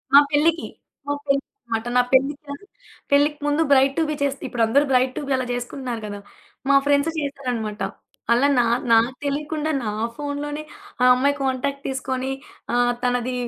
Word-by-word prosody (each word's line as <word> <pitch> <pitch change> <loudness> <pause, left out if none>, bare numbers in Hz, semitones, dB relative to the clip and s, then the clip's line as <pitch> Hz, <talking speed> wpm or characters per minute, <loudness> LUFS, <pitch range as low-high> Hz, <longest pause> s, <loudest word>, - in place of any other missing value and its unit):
మా - - +12
పెళ్ళికి. 320 +3 +2 0.4
మా 285 - +1
పెళ్ళినమాట. 275 - -2
నా - - +7
పెళ్లిగాను 285 +5 0 0.5
పెళ్ళికి 290 +1 +4
ముందు 290 +2 +2
బ్రైట్ 270 0 +5
టూ 325 - +3
బీ 305 - -1
చేస్తే 275 -1 -2
ఇప్పుడందరూ 240 +4 +2
బ్రైట్ 255 0 +3
టూ - - -1
బీ - - -3
అలా 260 -1 -1
జేసుకుంటున్నారు 245 -1 -4
గదా! 205 -1 -6 0.5
మా 280 - +6
ఫ్రెండ్స్ 285 +2 +3
జేసారనమాట. 250 -8 -3 0.5
అలా 250 +4 +4
నా 240 - +4 0.3
నాకు 230 +2 +4
తెలియకుండా, 300 +2 -2
నా 215 - -2 0.2
ఫోనూలోనే 290 +1 -4 0.4
ఆ - - +5
అమ్మాయి 280 +3 +2
కాంటాక్ట్ 275 +1 -1
తీసుకొని 260 0 -2 0.4
ఆహ్, 245 0 +3
తనది 245 0 0
275 Hz, 150 wpm, -23 LUFS, 245-285 Hz, 0.5 s, మా